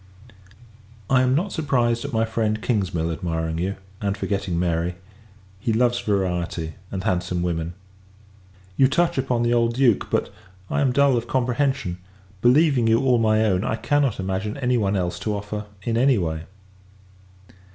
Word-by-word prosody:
I 130 -1 +5
am 130 0 +2
not 185 +6 0
surprised 120 -6 +1
at 140 - -4
my 115 -2 +1
friend 110 -1 -1
Kingsmill 90 -8 -1
admiring 80 -1 -2
you, 95 +3 -1 0.3
and 100 -1 -1
forgetting 100 -3 -2
Mary; 85 0 0 0.6
he 115 - -1
loves 120 +2 +2
variety, 90 -6 -1 0.2
and 95 -2 -4
handsome 90 -1 -1
women. 85 -1 -2 1.0
You 135 - +6
touch 170 +2 +1
upon 125 -3 0
the 120 0 +2
old 115 -1 +2
Duke; 125 -5 +2
but, - - -1 0.4
I - - +1
am 135 -3 +3
dull 140 -1 +4
of 120 0 -3
comprehension: 130 -6 0 0.4
believing 130 -1 +4
you 115 0 +4
all 130 -3 +3
my 110 -1 +3
own, 95 -2 +1
I 110 - 0
cannot 140 -1 +1
imagine 95 +4 -2
any 125 -2 +1
one 100 -4 +1
else 90 -2 -2
to 105 -1 -2
offer, 105 +1 -5 0.2
in 115 +1 0
any 130 0 +4
way. 80 -3 -2
110 Hz, 160 wpm, -23 LUFS, 90-125 Hz, 1.0 s, You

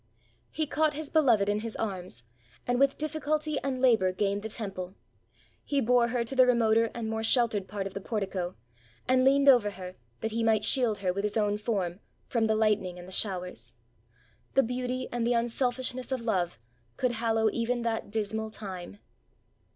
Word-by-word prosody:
He 315 - -2
caught 305 +1 +1
his 305 -1 -5
beloved 240 -11 +4
in 205 +1 +1
his 225 0 -5
arms, 185 - -5 0.4
and 245 0 0
with 275 0 +3
difficulty 305 -1 -1
and 265 -2 -3
labor 225 -8 +4
gained 200 +2 -1
the 220 - -5
temple. 195 -4 -6 0.7
He 285 - 0
bore 245 -1 +3
her 240 0 0
to 235 +4 -5
the 255 -1 +6
remoter 230 -2 +3
and 230 -2 -3
more 220 0 -2
sheltered 225 -4 +1
part 200 -1 -4
of 195 - -5
the 195 - -5
portico, 190 -4 -3 0.5
and 255 0 +4
leaned 275 +1 +4
over 245 -6 +6
her, 185 -2 -8 0.3
that 220 - -2
he 230 +1 -1
might 220 -2 +3
shield 230 -2 +3
her, 185 -2 -1
with 200 +2 -3
his 210 +1 -1
own 210 -1 +1
form, 195 -5 -2 0.3
from 225 -2 +1
the 220 - +2
hghtning 210 -4 +1
and 175 0 -10
the - - -11
showers! 180 - -3 0.8
The 270 - +6
beauty 250 +1 -3
and 240 -1 -1
the 245 - +3
unselfishness 250 +2 -1
of 260 -2 -1
love 185 - -1 0.4
could 255 - +1
hallow 225 -2 +1
even 235 +1 -1
that 225 -2 -2
dismal 220 +1 -2
time! 195 -3 -7
225 Hz, 180 wpm, -29 LUFS, 200-250 Hz, 0.8 s, the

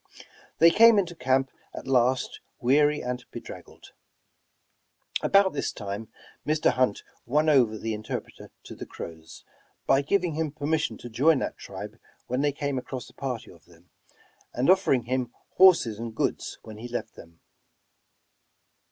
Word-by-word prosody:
They 165 +1 +7
came 230 +3 +7
into 180 -3 0
camp 130 -2 +1 0.2
at - - -7
last, 130 0 +1 0.2
weary 145 +4 +3
and 125 0 -4
bedraggled. - - -11 1.3
About 195 -1 +4
this 145 - -2
time 100 +1 -6 0.4
Mr. 155 +1 +2
Hunt 125 -5 0 0.2
won 150 +5 +2
over 120 -7 +4
the 110 +1 -3
interpreter 105 0 -6
to - - -10
the - - -9
Crows, 80 -1 -10 0.4
by 135 - +4
giving 175 +3 0
him 155 -1 -2
permission 155 +1 -1
to 120 - -9
join 145 +7 +4
that - - -3
tribe - - -9 0.3
when 125 +2 -1
they 145 0 +2
came 140 -1 -2
across 125 0 -7
a - - -31
party 125 -4 -5
of 85 - -19
them, 85 0 -22 0.6
and 130 +8 +4
offering 185 -10 +3
him 125 0 -2 0.3
hoi*ses 165 - +5
and 115 -1 -6
goods - - -2
when 110 -1 -10
he 120 - -7
left 120 -2 -5
them. 85 0 -15
130 Hz, 150 wpm, -26 LUFS, 115-150 Hz, 1.3 s, They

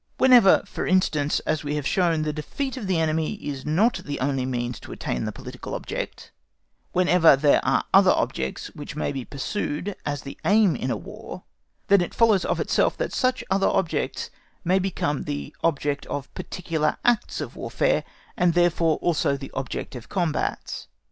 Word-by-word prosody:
Whenever, 245 -7 +6
for - - -4
instance, 155 -6 +2
as 155 0 -1
we 145 0 -2
have 150 -2 -3
shown, 165 -2 +2
the 155 -1 -1
defeat 265 - -4
of 235 -7 -5
the 185 -2 +1
enemy 160 +3 0
is 145 -8 -6
not 195 +11 +3
the 145 -6 -5
only 130 -1 0
means 120 -1 -3
to - - -11
attain 60 - -3
the - - -2
political - - -7
object, - - -5 0.6
whenever 180 -4 +5
there 145 +1 +3
are - - +2
other - - +7
objects 65 0 -1
which - - -8
may - - -1
be 135 -2 -4
pursued 160 - -3
as 145 -1 -3
the 140 - -9
aim 205 -3 +4
in 130 - -3
a 115 - 0
War, - - -9 0.4
then 200 -1 +5
it 175 - -3
follows 220 -5 +4
of - - 0
itself - - +1
that - - -2
such 255 -1 +1
other 195 0 +3
objects 170 -4 -1 0.3
may 185 +3 +3
become 170 -6 -1
the 70 -1 -5
object 145 -3 0
of 145 -1 -5
particular 160 -4 -2
acts 240 -2 +2
of - - -5
Warfare, - - 0 0.3
and 175 -2 +2
therefore 170 -2 +3
also 145 -4 +1
the 135 0 -9
object 130 -1 -4
of 120 - -9
combats. 170 -5 -2
160 Hz, 175 wpm, -24 LUFS, 145-190 Hz, 0.6 s, other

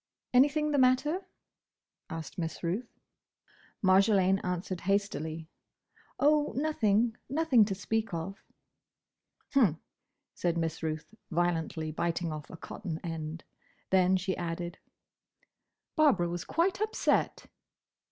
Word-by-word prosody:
"Anything 295 +4 +4
the 285 - +2
matter?" 295 +9 +2 0.8
asked 160 0 -6
Miss 165 +1 -4
Ruth. 195 +8 -2 0.9
Marjolaine 195 0 +4
answered 180 0 -3
hastily, 165 -5 -1 0.7
"Oh, 295 +1 +3
nothing. 230 -6 +2
Nothing 275 -6 +4
to 200 -2 -2
speak 220 +2 -1
of." 170 +4 -5 1.1
"H'm," 215 - +3 0.5
said 170 -1 -1
Miss 165 -1 -2
Ruth, 155 +3 -4 0.2
violently 165 -2 -1
biting 170 +1 -1
off 155 -1 -7
a 165 - -9
cotton 165 -1 -6
end. 165 -1 -5 0.5
Then 185 0 +4
she 185 +1 -2
added, 175 0 -4 1.2
"Barbara 275 - +4
was 175 -1 -4
quite 375 +5 +1
upset." 430 0 +1
185 Hz, 105 wpm, -30 LUFS, 165-255 Hz, 1.2 s, Anything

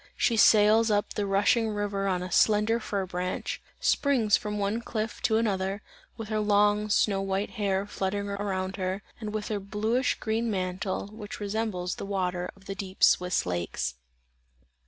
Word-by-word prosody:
She 235 - +2
sails 220 +1 +6
up 205 -1 +1
the 205 -1 -2
rushing 205 +3 +3
river 205 -1 -2
on 180 -2 0
a 180 - -6
slender 215 +4 +3
fir 200 -3 -2
branch 180 0 -3 0.2
springs 245 -7 +3
from 210 0 -3
one 205 +3 -1
cliff 225 -1 -4
to 220 - +2
another, 200 -2 -1 0.3
with 225 -2 -6
her 215 -1 0
long 210 0 +3
snow 200 -1 +2
white 195 +1 -2
hair, 200 -3 -1
fluttering 200 0 -2
around 195 -1 -3
her, 190 +1 -2 0.2
and 215 -2 -5
with 215 -1 -4
her 210 -2 -1
bluish 215 +6 0
green 225 +2 -1
mantle, 185 -1 -2
which 215 -1 -8
resembles 205 -3 -2
the - - -5
water 180 -2 -1
of 195 -1 -21
the 195 - -4
deep 190 -1 -6
Swiss 180 0 +4
lakes. 85 -6 -2
205 Hz, 165 wpm, -28 LUFS, 190-215 Hz, 0.3 s, sails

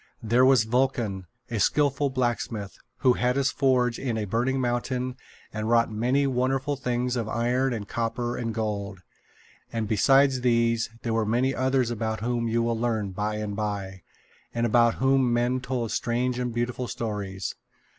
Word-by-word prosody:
There 120 +3 +3
was 130 -3 +6
Vulcan, 110 -5 0 0.2
a 115 - -1
skillful 145 +5 +2
blacksmith, 120 -5 -2 0.3
who 130 -2 +5
had 125 0 0
his 135 -2 +2
forge 125 -3 +2
in 120 -4 -2
a 110 - -1
burning 120 +6 0
mountain 125 +1 -1 0.4
and 110 +1 -3
wrought 115 -1 +3
many 125 +6 +1
wonderful 135 +2 0
things 125 -1 -1
of 115 -3 -2
iron 125 +3 +1
and 105 -4 -4
copper 115 +2 -2
and 115 -1 -3
gold. 100 -3 -3 0.7
And 115 -2 -2
besides 135 +5 +4
these, 115 -2 +2
there 115 - -1
were 115 0 +2
many 120 +5 +1
others 130 -2 +1
about 110 -1 -2
whom 120 0 -1
you 115 +1 +1
will 115 -1 -1
learn 110 -4 -1
by 105 +3 -2
and 105 -1 -4
by, 100 -3 -4 0.5
and 115 0 +1
about 115 0 +4
whom 135 -1 +2
men 120 +2 +1
told 125 -3 -2
strange 125 +1 -1
and 125 -1 -1
beautiful 120 +1 -2
stories. 100 -5 -4
120 Hz, 165 wpm, -26 LUFS, 110-125 Hz, 0.7 s, was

